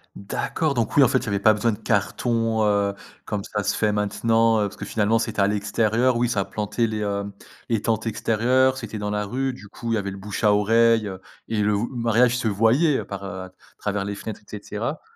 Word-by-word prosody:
D'accord, 140 +8 -2
donc 115 -3 -1
oui, 145 - +7
en 120 - +5
fait, 130 - +3
il 130 - -3
y - - -10
avait 100 -1 0
pas 110 - +6
besoin 110 +1 +1
de - - -6
cartons, 115 +1 0
heu, 100 -1 +2 0.3
comme 105 -2 -3
ça 105 -1 -3
se - - 0
fait 105 -1 +1
maintenant, 115 +2 +2
heu, - - +2
parce - - -15
que - - -6
finalement 110 +1 +1
c'était 115 -3 -1
à 100 - +4
l'extérieur. 110 +4 +1
Oui, 120 0 +1
ça 100 -4 0
plantait 105 +2 -1
les, 110 -1 -3
hem 100 0 -2 0.3
les 115 -3 0
tentes 110 0 -1
extérieures, 125 +4 +2
c'était 110 -4 -6
dans 105 0 -3
la 105 0 -1
rue. 130 +5 -1
Du 105 -5 -12
coup, 115 +3 -6
il - - +2
y - - +1
avait 100 -1 -3
le 100 - -8
bouche-à-oreille, 105 +2 +2
heu, 95 -1 -7 0.3
et 110 -2 0
le 105 0 +2
v 105 - -1
mariage 120 0 +2
se 115 - -1
voyait, 115 - +3
heu, - - -4
par 100 0 -6
heu, 95 -1 -6
à 95 - -11 0.3
travers 100 -1 -2
les 100 0 -4
fenêtres, 110 +1 -7
et - - -28 0.2
cetera? 115 +9 -4
110 Hz, 240 wpm, -23 LUFS, 105-115 Hz, 0.3 s, oui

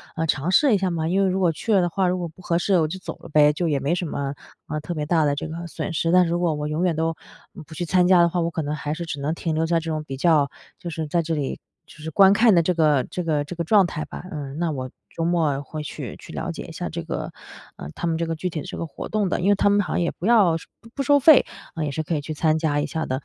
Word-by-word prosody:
呃， 160 - -1
尝 150 +1 0
试 265 +5 +5
一 - - +4
下 190 -1 0
嘛。 160 -2 -2
因 195 +3 +2
为 190 - +2
如 185 +1 0
果 180 -3 +3
去 220 +7 -4
了 195 -3 +5
的 175 - +1
话， 185 +1 0
如 180 - +1
果 175 -1 -3
不 165 +3 -15
合 170 -1 0
适 185 +1 +2
我 155 - +2
就 190 - -5
走 185 - -7
了 - - -11
呗， 150 0 +5
就 170 +3 -1
也 145 -3 +1
没 140 +5 0
什 180 0 -1
么， 140 -1 -3 0.3
呃， 155 - -3
特 160 +3 -5
别 150 - -2
大 160 0 +2
的 145 -1 +1
这 145 - -4
个 170 +2 -6
损 170 +2 -5
失。 165 +1 0
但 180 0 +5
如 170 +1 -1
果 175 -2 +1
我 150 0 -3
永 155 +4 -1
远 175 -3 +1
都， 165 0 -1 0.4
嗯， 175 - -9
不 160 - -13
去 175 - -3
参 180 +1 +3
加 185 -2 +6
的 170 - +4
话， 175 - -1
我 165 - 0
可 160 -1 -3
能 150 +1 -2
还 150 0 -3
是 170 +2 -5
只 150 -3 -5
能 150 +3 -1
停 165 -2 -2
留 160 +1 +1
在 165 0 +2
这 165 0 -4
种 155 -1 -2
比 135 -3 -7
较 150 -2 +3 0.3
就 175 - -6
是 160 -1 -4
在 170 +3 +1
这 165 0 -2
里 140 -3 -3 0.3
就 - - -17
是 160 +1 -5
观 195 +4 +6
看 220 -1 +5
的 170 - +4
这 180 +2 +1
个 150 -5 +3
这 180 - -3
个 150 -3 0
这 165 +5 -8
个 170 - -2
状 195 +2 +5
态 155 -2 -4
吧。 - - -9
嗯， 145 -2 -6
那 170 -2 0
我 130 -2 -4 0.3
周 165 - -2
末 160 -5 +1
会 150 +2 -7
去 - - -7
去 - - -12
了 - - -4
解 - - -7
一 - - -10
下 - - -5
这 - - -5
个 - - -4 0.4
呃， 70 - -8
他 170 - -3
们 160 - 0
这 170 - -1
个 165 - -2
具 180 +3 -3
体 160 - -4
的 - - -9
这 - - -6
个 165 - -4
活 - - -7
动 210 -3 0
的。 - - -1
因 185 +3 +1
为 205 - +5
他 200 - +3
们 205 0 +4
好 180 - -4
像 - - +1
也 170 - +1
不 175 - -7
要 200 -8 +5
是 - - -12 0.2
不 230 - -15
不 275 - -1
收 285 +2 +4
费， 300 +1 +7 0.3
呃， 160 -2 -2
也 145 - -2
是 155 - -2
可 160 +1 -2
以 145 - -1
去 155 +2 -5
参 155 +1 +2
加 155 -2 0
一 - - -2
下 160 -1 -3
的。 130 +2 -3
165 Hz, 355 characters per minute, -23 LUFS, 155-180 Hz, 0.4 s, 费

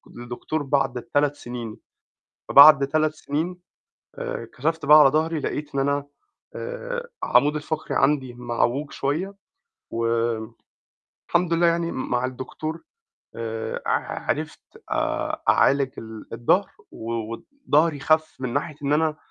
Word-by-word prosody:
لدكتور 120 +5 -4
بعد 135 -3 0
3 145 0 +2
سنين، 120 -4 -7 0.7
فبعد 140 -1 +9
3 155 +1 +1
سنين، 165 +5 -3 0.6
آآ - - -5
كَشَفت 160 +2 -1
بقى 150 +1 +9
على 145 - +8
ضَهري، 155 +2 0
لقيت 145 0 -4
إن - - +1
أنا 140 +1 0 0.5
آآ - - -5
عمودي 150 +1 +3
الفقري 155 +1 -4
عندي 135 -3 +1
معووج 120 +4 -1
شوية، 165 +9 -2 0.6
و 115 0 -1 1.2
الحمد 175 -1 +2
لله 170 +1 +4
يعني 170 0 +1
م 130 - -4
مع 125 +1 +1
الدكتور 145 +5 -6 0.5
آآ 115 -1 -4
ع - - -2
عرفت - - -2 0.3
آآ - - -1
أعالج 140 -1 +4
ال 110 -1 -10
الضَهر، 180 +12 +2 0.2
و 115 +1 -6 0.2
وضهري 165 - 0
خَف 155 +2 +2
من 125 -2 -3
ناحية 145 +2 -2
إن 145 +1 +1
أنا 155 0 +1
145 Hz, 130 wpm, -24 LUFS, 130-160 Hz, 1.2 s, فبعد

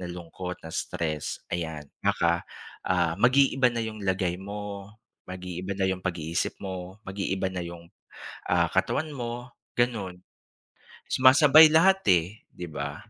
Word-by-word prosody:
na 90 - -5
lungkot, 90 +1 -7
na 80 - -8
stress, 75 -3 -3
ayan 80 -3 -3 0.2
baka, 85 0 +1 0.4
ah, 85 -3 +1
mag-iiba 130 0 +4
na 115 -1 -3
yung 110 -1 -6
lagay 95 -2 -1
mo, 100 0 -7 0.4
mag-iiba 90 +1 -5
na 95 - 0
yung 95 -1 -1
pag-iisip 85 -3 -2
mo, 95 0 -6
mag-iiba 95 -1 -2
na 90 - -3
yung, 85 0 -9 0.6
ah, - - +3
katawan 155 - 0
mo, 120 0 -5 0.3
gano'n. 100 -7 0 0.9
Sumasabay 145 +4 +8
lahat 190 +5 +5
eh 90 +5 +1
di 90 - -9
ba? 70 -3 -5
95 Hz, 135 wpm, -27 LUFS, 85-115 Hz, 0.9 s, Sumasabay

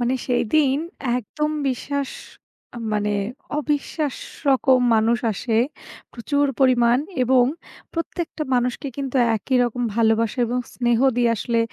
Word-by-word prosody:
মানে 245 +2 +1
সেইদিন 265 +3 +2 0.4
একদম 300 +6 -3 0.2
বিশ্বাস 275 +2 -2 0.8
মানে 210 0 0 0.5
অবিশ্বাস 295 -1 -2 0.3
রকম 265 -1 +4 0.2
মানুষ 225 +2 +3
আসে 225 +3 -2 0.6
প্রচুর 285 +4 0
পরিমাণ 245 -2 +4 0.2
এবং 250 0 +4 0.5
প্রত্যেকটা 330 -1 -4
মানুষকে 250 +3 -1
কিন্তু 275 -2 -3 0.2
একই 255 +5 -1
রকম 245 +1 -2
ভালোবাসা 225 +1 +2
এবং 245 +2 -1 0.2
স্নেহ 240 -2 +1 0.2
দিয়ে 240 -1 +3
আসলে 230 +3 -1
250 Hz, 115 wpm, -22 LUFS, 235-275 Hz, 0.8 s, রকম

